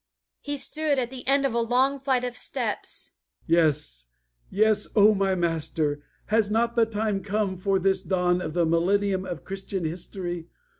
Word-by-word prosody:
He 290 -1 -4
stood 305 +1 -1
at 245 -1 -1
the 260 -1 -9
end 275 +1 +4
of 265 - 0
a 235 - +1
long 260 +4 +2
flight 260 -2 +1
of 245 -1 -3
steps. 245 - -3 0.3
"Yes! 150 - +1 0.4
Yes! 210 +1 +2
O 215 0 +7
my 195 -1 +1
Master, 160 -3 -1 0.2
has 215 -1 +2
not 230 +2 +1
the 230 -2 +4
time 210 -2 -1
come 205 -1 -1
for 195 +1 +1
this 190 0 +1
dawn 180 -1 +1
of 160 - -5
the 175 -1 +3
millennium 190 +3 +1
of 175 -3 -6
Christian 195 -2 -4
history? 175 0 -5
195 Hz, 165 wpm, -26 LUFS, 175-230 Hz, 0.4 s, O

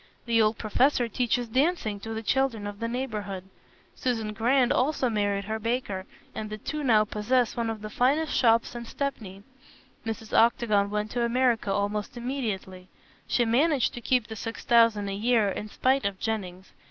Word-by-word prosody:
The 230 -1 +3
old 215 0 +2
professor 245 +3 +2
teaches 245 +1 0
dancing 255 - 0
to 225 +3 -7
the 225 0 -4
children 240 -2 0
of 205 0 -6
the 230 - -2
neighborhood. 215 -6 -4 0.5
Susan 225 -4 -2
Grant 245 +4 +2
also 260 -2 +1
married 205 -2 0
her 220 +2 -3
baker, 220 -4 -2 0.3
and 215 -1 -5
the 215 - -5
two 300 +7 -4
now 220 -5 +4
possess 220 +3 0
one 235 -1 -1
of 220 -1 -5
the 215 - -5
finest 290 +7 +1
shops 230 -2 +3
in 240 -1 -6
Stepney. 220 -8 -5 0.6
Mrs. 225 -1 -5
Octagon 215 -3 +3
went 210 +1 -2
to 240 - -1
America 235 -3 +1
almost 205 +3 -2
immediately. 215 -8 -4 0.4
She 240 - +2
managed 270 +4 +2
to 240 - -7
keep 250 -1 +1
the 220 - -8
six 225 +2 -6
thousand 230 -4 +4
a 195 - -3
year, 220 0 +2
in 210 +2 -4
spite 265 +5 +1
of 200 -1 -2
Jennings. 190 -4 -4
225 Hz, 175 wpm, -27 LUFS, 210-245 Hz, 0.6 s, now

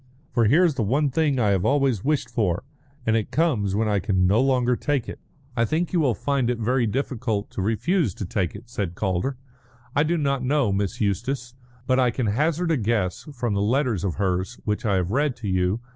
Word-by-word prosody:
"For 115 - +2
here's 160 - +4
the 135 - -2
one 135 +7 +1
thing 145 -1 +1
I 110 -4 +2
have 95 -3 +2
always 135 -7 +2
wished 145 -4 0
for, 105 -6 -1 0.4
and 110 - +2
it 110 -2 0
comes 120 - +1
when 110 +1 +1
I 105 -1 +2
can 95 -1 +1
no 100 +6 +4
longer 125 -2 +2
take 140 -1 -1
it." - - -7 0.4
"I 115 - +2
think 160 - -1
you 175 - +3
will 130 -8 +2
find 140 -4 0
it 125 - 0
very 120 +2 +1
difficult 115 -3 -2
to - - -4
refuse 115 - 0
to 100 - -4
take 90 0 -2
it," 115 +4 -10
said 100 -7 -4
Calder. 95 +8 -1 0.6
"I 145 - +4
do 165 +3 +1
not 140 -4 0
know 135 -4 +2
Miss 100 +1 -2
Eustace, 120 +5 -1 0.3
but 130 +1 +2
I 125 -1 +4
can 120 +1 -2
hazard 155 - +1
a 160 - +2
guess 105 - -1
from 120 -5 -2
the 100 - 0
letters 120 - +1
of 95 -4 -1
hers 95 +3 -1
which 105 +2 -1
I 100 - +2
have 90 0 0
read 140 +1 +1
to 120 -3 -6
you. 95 +3 0
120 Hz, 220 wpm, -24 LUFS, 100-140 Hz, 0.6 s, here's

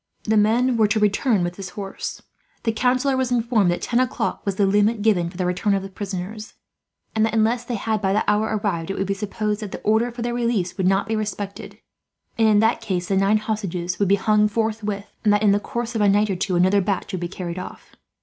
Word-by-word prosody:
The 220 - +1
men 230 +4 +3
were 220 -2 +4
to 215 +1 +1
return 210 0 +2
with 175 0 -3
his 195 -2 -6
horse. 195 -1 -6 0.4
The 230 - +1
councillor 255 +4 +1
was 260 -1 -1
informed 230 -5 +2
that 175 - -1
ten 240 - +1
o'clock 255 -1 -1
was 195 - 0
the 200 - +2
limit 205 +2 +2
given 180 -6 +2
for 175 - -12
the 185 - -1
return 180 +3 +1
of 195 - -2
the 195 - -7
prisoners; 200 +2 -6 0.6
and 220 - +3
that, 220 0 +1
unless 225 +2 +2
they 240 - -3
had 220 0 -1
by 190 -1 +1
that 210 - +1
hour 210 +1 +2
arrived, 200 -6 -2
it 195 - -3
would 195 - 0
be 195 - -1
supposed 210 +1 -2
that 210 -3 -6
the - - -7
order 220 +3 +2
for 235 0 -6
their 240 0 -2
release 235 -7 -1
would 190 -2 0
not 195 +1 +2
be 220 - -1
respected, 205 -2 -5 0.6
and 225 -1 +3
in 210 -1 +5
that 225 +1 +2
case 185 -5 -3
the 195 - +2
nine 195 +2 +3
hostages 190 -5 -3
would 200 - +2
be 200 - +5
hung 210 +1 +3
forthwith; 210 -2 -2 0.2
and 210 - +4
that, 205 +1 +2
in 205 - +5
the 200 - +3
course 235 +2 -4
of 225 - -1
a 205 - +4
night 205 +1 +3
or - - -1
two, 180 +1 -1
another 185 +3 +4
batch 195 -1 -2
would 185 - -3
be 175 - -2
carried 180 -1 -6
off. 185 - -10
210 Hz, 245 wpm, -22 LUFS, 195-225 Hz, 0.6 s, in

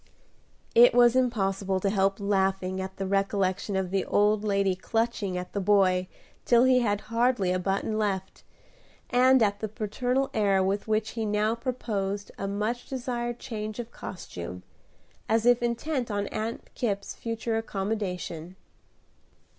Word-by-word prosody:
It 240 +1 +7
was 240 0 +6
impossible 195 -6 +1
to 195 +1 0
help 195 0 +1
laughing 190 -2 0
at 190 - -6
the 195 - -2
recollection 195 0 0
of 190 -1 -1
the 195 -1 +1
old 210 +1 +2
lady 200 -2 +2
clutching 220 -2 -1
at 180 0 -6
the 200 - -1
boy 190 -2 +3 0.4
till 240 0 +5
he 255 -1 +5
had 205 -4 0
hardly 235 -5 +2
a 185 - +1
button 195 +3 -1
left, 190 -3 -2 0.7
and 255 0 +5
at 205 -1 +1
the 220 - -2
paternal 245 +6 -1
air 200 -3 +3
with 195 +3 -1
which 215 0 0
he 225 - -3
now 210 +1 +1
proposed 210 -5 -3
a 195 - -2
much 215 +5 -2
desired 240 -2 -3
change 215 -3 -5
of 240 -1 -6
costume, 90 - -8 0.7
as 225 +1 +2
if 245 0 +5
intent 240 +2 -1
on 205 -1 -1
Aunt 220 +2 -5
Kipp's 200 -4 -2
future 230 0 -3
accommodation. 190 -5 -4
210 Hz, 145 wpm, -27 LUFS, 195-235 Hz, 0.7 s, It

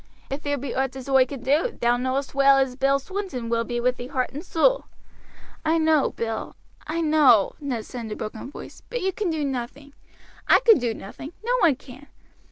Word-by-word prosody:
If 275 +2 -3
there 285 -1 -1
be 270 -1 -5
owt 265 0 -1
as 265 -1 -8
oi 265 -1 +4
can 265 -2 -8
do, 305 - +1
thou 240 0 +3
knowest 260 +2 -2
well 275 0 +5
as 265 -2 +1
Bill 275 +1 +2
Swinton 280 - -5 0.2
be 240 -1 -2
with 250 +1 +1
thee 245 - -6
heart 255 -1 -2
and 295 +4 -6
soul." - - +2 0.8
"I 320 +1 +2
know, 315 -3 +3
Bill 225 -1 -4 0.3
I 330 +2 -1
know," 300 -10 +5
Ned 255 -7 -4
said 240 -2 -7
in 220 - -7
a - - -3
broken 220 +3 -6
voice, - - -11
"but 485 -1 -3
you 380 0 0
can 410 -2 -2
do 315 -3 -1
nothing; 270 +2 -5 0.5
I - - +7
can 460 -7 +6
do 235 -2 -1
nothing; 270 - -9
no - - +1
one 325 - +4
can. 270 +2 -14
275 Hz, 205 wpm, -24 LUFS, 250-310 Hz, 0.8 s, I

